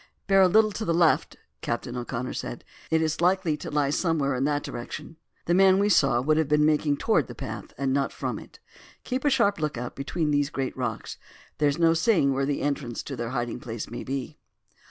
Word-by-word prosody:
"Bear 195 -1 +5
a 190 - +7
little 215 +3 +4
to 215 - -4
the 170 -5 0
left," 170 -1 +2 0.2
Captain 120 +1 -3
O'Connor 125 0 -4
said; - - -5 0.3
"it 160 0 +2
is 160 +1 -1
likely 180 -3 +2
to - - -7
lie 145 -2 +1
somewhere 150 -4 +1
in 130 +1 0
that 145 0 0
direction. 120 +6 -7 0.3
The 170 - +1
man 190 +1 +6
we 200 +1 +2
saw 135 -10 +4
would 155 +5 +2
have 160 -2 +2
been 150 0 +3
making 150 -1 +2
towards - - +2
the - - -9
path - - -7
and 135 0 0
not 140 0 0
from - - -4
it. - - -14 0.5
Keep 255 +2 -3
a - - +5
sharp 220 -8 +2
look 150 -4 -2
out 120 +1 -5
between 150 +3 -2
these 145 -1 +1
great 135 -2 -3
rocks; 120 -4 -4 0.4
there 150 -1 +4
is 140 - -2
no 165 -1 +4
saying 165 - +3
where 135 +1 0
the 145 - -1
entrance 140 -5 -2
to 135 - -6
their 120 -1 -4
hiding 120 -1 -3
place 115 -2 -6
may 120 - -5
be." 135 +2 -5
145 Hz, 220 wpm, -26 LUFS, 130-170 Hz, 0.5 s, a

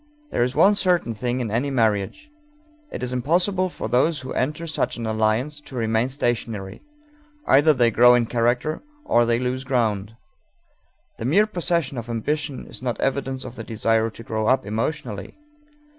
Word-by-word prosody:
There - - 0
is 125 +2 0
one 200 - +6
certain 180 - +1
thing 125 +3 -2
in 115 -4 -3
any 125 +6 0
marriage: 115 - 0 0.6
it - - -5
is 125 0 -2
impossible 180 +8 +1
for - - -5
those 145 +4 +2
who 130 - -6
enter 150 +5 -2
such 155 - -1
an 115 - -4
alliance 110 +7 0
to 145 -2 -11
remain 115 +1 +1
stationary; 115 -7 -3 0.6
either 145 +4 +5
they 120 -5 +3
grow 125 +2 +6
in 120 -1 +2
character 120 +6 0 0.2
or 120 0 +3
they 115 0 +2
lose 125 +1 -2
ground. 110 -6 -1 1.0
The 115 - -4
mere 190 - +4
possession 170 - -1
of 115 +1 -8
ambition 145 +5 -2
is - - -8
not 120 -3 -3
evidence 135 -1 -1
of 130 -1 -8
the 115 - -7
desire 115 0 +1
to 115 - -12
grow 110 -1 -2
up 130 -2 +2
emotionally. 110 - -4
125 Hz, 170 wpm, -23 LUFS, 115-145 Hz, 1.0 s, one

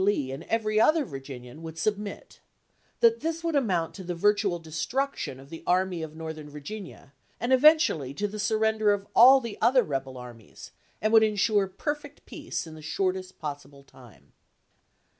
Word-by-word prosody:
Lee 170 -10 +1
and 135 - -6
every 215 -1 +1
other 310 +4 +4
Vir 135 -5 -7
ginian 130 0 -10
would 165 0 -9
submit; 205 +4 -3 0.6
that 465 -1 +5
this 330 +1 -3
would 330 -2 -1
amount 185 - 0
to 190 - -9
the 175 0 -4
virtual 205 0 +2
destruction 165 - -3
of 135 +1 -15
the 165 - -8
Army 180 -1 +1
of 155 -1 -7
Northern 160 -2 -7
Virginia, 150 0 -9 0.3
and 240 +3 +1
eventually 270 - +4
to 205 - -1
the 210 +1 -7
surrender 220 0 +2
of 200 -1 -4
all 260 +4 +9
the 235 -4 -7
other 255 0 +5
rebel 135 -3 -4
armies, 120 -4 -12 0.3
and 215 +1 +1
would 225 - +8
insure 210 -1 +2
perfect 290 +9 -5
peace - - -5
in 160 - -10
the 155 - -11
shortest 185 +3 -2
possible 145 -2 -8
time." 120 - -18
190 Hz, 170 wpm, -27 LUFS, 150-220 Hz, 0.6 s, all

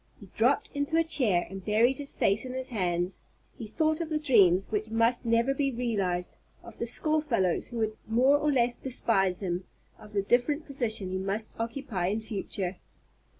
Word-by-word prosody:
He - - -12
dropped - - +2
into 285 +2 -1
a 330 - +4
chair 245 - +3
and 195 0 -8
buried 230 +6 +2
his 285 -1 -2
face 200 +2 +2
in 255 0 -6
his 260 0 -4
hands. 180 -4 -1 0.3
He 230 -5 -8
thought 315 +7 0
of 325 - -4
the 310 - 0
dreams 200 - +3
which 215 0 -2
must 230 +2 +1
never 230 +4 +2
be 275 0 0
realized, 200 -8 -2 0.2
of - - -12
the - - -2
school 310 -2 +2
fellows 210 - 0
who 240 - -7
would 220 -1 -1
more 255 +6 +4
or 300 0 +1
less 245 -3 +2
despise 200 -8 0
him, 180 0 -2 0.3
of 210 0 -14
the 200 -1 0
different 255 +8 +1
position 220 -9 -1
he 185 - -2
must 200 +3 -2
occupy 230 -6 -3
in 210 +4 0
future. 195 -4 -3
230 Hz, 190 wpm, -28 LUFS, 195-270 Hz, 0.3 s, a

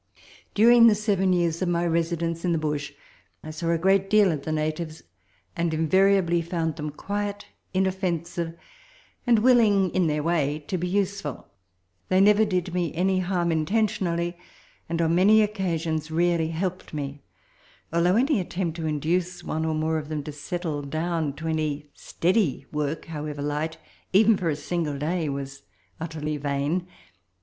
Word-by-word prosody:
During 230 +2 +7
the 220 - +5
seven 200 -3 +1
years 170 -2 +1
of 185 - +1
my 170 0 +1
residence 165 0 -1
in 175 -2 +1
the - - +1
bush 150 -2 -2 0.5
I 155 - -6
saw 165 +2 -3
a 170 - +3
great 195 +3 +2
deal 210 -3 +5
of 150 -3 -3
the 155 - -2
natives, 155 +1 -3 0.5
and 170 -1 0
invariably 175 +1 +3
found 165 -2 -2
them 150 0 -4
quiet, 205 +6 -4 0.3
inoffen 185 -3 0
sive, 170 -1 -5 0.7
and 235 -1 +5
willing, 215 -6 +4
in 185 -2 +2
their 150 -1 0
way, 150 -3 +1
to 185 - -1
be 180 - -2
useful. 195 - -2 0.6
They 185 - +4
never 210 +2 +5
did 180 -3 -1
me 175 -2 0
any 185 +2 +2
harm 175 -2 0
intentionally, 175 0 0 0.5
and 165 0 -1
on 165 0 +2
many 210 +5 +6
occasions 165 -7 -2
really 170 0 +1
helped 175 +1 -4
me; 140 -1 -5 0.7
although 175 +2 +3
any 260 +1 +3
attempt 175 -2 -3
to 160 -1 -3
induce 170 +4 -1
one 160 +1 -2
or 160 -1 0
more 160 +1 0
of 150 0 -9
them 150 -2 -3
to 150 - -6
settle 150 +1 -4
to 155 0 -2
any 150 -2 -2
steady 175 - 0
work, 150 +1 -2
however 150 -2 -5
light, 150 +2 -2 0.4
even 220 +3 +6
for 180 -3 -1
a 150 - 0
single 155 -1 -2
day, 160 +2 -1
was 140 0 -5 0.4
utterly 155 -2 -3
vain. 145 +5 -1
170 Hz, 160 wpm, -25 LUFS, 155-185 Hz, 0.7 s, During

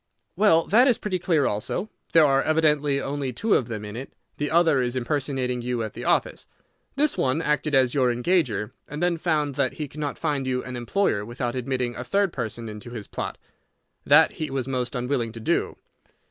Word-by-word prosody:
"Well, 165 -6 +4
that 240 +6 +5
is 245 - +4
pretty 185 -3 -2
clear 165 -5 +2
also. 105 - -2 0.3
There 165 -2 +7
are 135 -1 +3
evidently 150 -3 +2
only 140 -1 -3
two 210 - 0
of 120 - +2
them 110 -3 -5
in 105 +1 -7
it. 130 +3 -7 0.3
The 145 0 -1
other 160 -5 +4
is 125 0 -1
impersonating 130 -1 -1
you 120 -1 -2
at 110 - -5
the - - -7
office. - - 0 0.5
This 295 +2 +1
one 130 +3 +1
acted 150 -2 0
as 130 -2 +3
your 130 -4 +3
engager, 120 - 0 0.2
and 150 +4 -4
then 175 -1 +2
found 155 -4 0
that 140 -3 +1
he 150 - -5
could 150 - -11
not 145 -2 -3
find 145 -4 -1
you 125 -1 -1
an 125 0 -6
employer 120 - 0
without 120 +2 -4
admitting 125 -1 -2
a - - -5
third 195 +6 +1
person 110 +1 -4
into 105 +3 -8
his 115 -4 -7
plot. - - -5 0.7
That - - +6
he 155 - -5
was 135 -2 -2
most 130 -1 -2
unwilling 125 -2 -1
to 115 - -8
do. 110 - -1
135 Hz, 200 wpm, -25 LUFS, 120-155 Hz, 0.7 s, There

